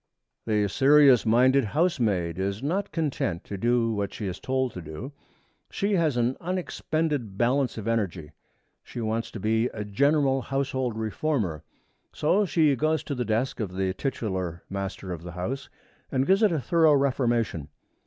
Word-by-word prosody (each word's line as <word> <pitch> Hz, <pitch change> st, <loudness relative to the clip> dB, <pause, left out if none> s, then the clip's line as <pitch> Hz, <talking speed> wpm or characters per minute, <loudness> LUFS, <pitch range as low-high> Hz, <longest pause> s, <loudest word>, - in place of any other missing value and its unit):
The 105 Hz, -2 st, +2 dB
serious 135 Hz, +1 st, +5 dB
minded 130 Hz, +4 st, +4 dB
housemaid 105 Hz, -, 0 dB
is 100 Hz, +4 st, -2 dB
not 190 Hz, +7 st, -1 dB
content 145 Hz, -, -2 dB
to 100 Hz, -, -6 dB
do 115 Hz, +3 st, +1 dB
what 100 Hz, -2 st, -2 dB
she 105 Hz, -, -6 dB
is 95 Hz, -2 st, -4 dB
told 130 Hz, -1 st, -1 dB
to 90 Hz, -, -7 dB
do. 80 Hz, -, -7 dB, 0.6 s
She 200 Hz, +1 st, -1 dB
has 160 Hz, -8 st, +2 dB
an 120 Hz, +2 st, +1 dB
unexpended 155 Hz, -, -2 dB
balance 125 Hz, +2 st, +1 dB
of 110 Hz, 0 st, -5 dB
energy. 95 Hz, -9 st, -2 dB, 0.5 s
She -, -, -9 dB
wants 115 Hz, 0 st, -2 dB
to 110 Hz, -, -8 dB
be 110 Hz, +3 st, +1 dB
a 105 Hz, -4 st, -6 dB
general 135 Hz, +5 st, +2 dB
household 130 Hz, -3 st, -2 dB
reformer. 110 Hz, -, -1 dB, 0.5 s
So 195 Hz, +7 st, +2 dB
she 155 Hz, -5 st, +3 dB
goes 155 Hz, +5 st, 0 dB
to 145 Hz, -, -4 dB
the 125 Hz, -2 st, -2 dB
desk 110 Hz, +5 st, -1 dB
of 95 Hz, -5 st, -4 dB
the 95 Hz, 0 st, 0 dB
titular 95 Hz, -, -3 dB
master 100 Hz, -1 st, -4 dB
of 85 Hz, -3 st, -5 dB
the 90 Hz, 0 st, -8 dB
house 115 Hz, +11 st, -4 dB, 0.4 s
and 130 Hz, -1 st, +1 dB
gives 195 Hz, +5 st, +3 dB
it 215 Hz, -3 st, +4 dB
a 160 Hz, -, 0 dB
thorough 160 Hz, +1 st, +4 dB
reformation. 120 Hz, -, 0 dB
120 Hz, 165 wpm, -26 LUFS, 100-140 Hz, 0.6 s, serious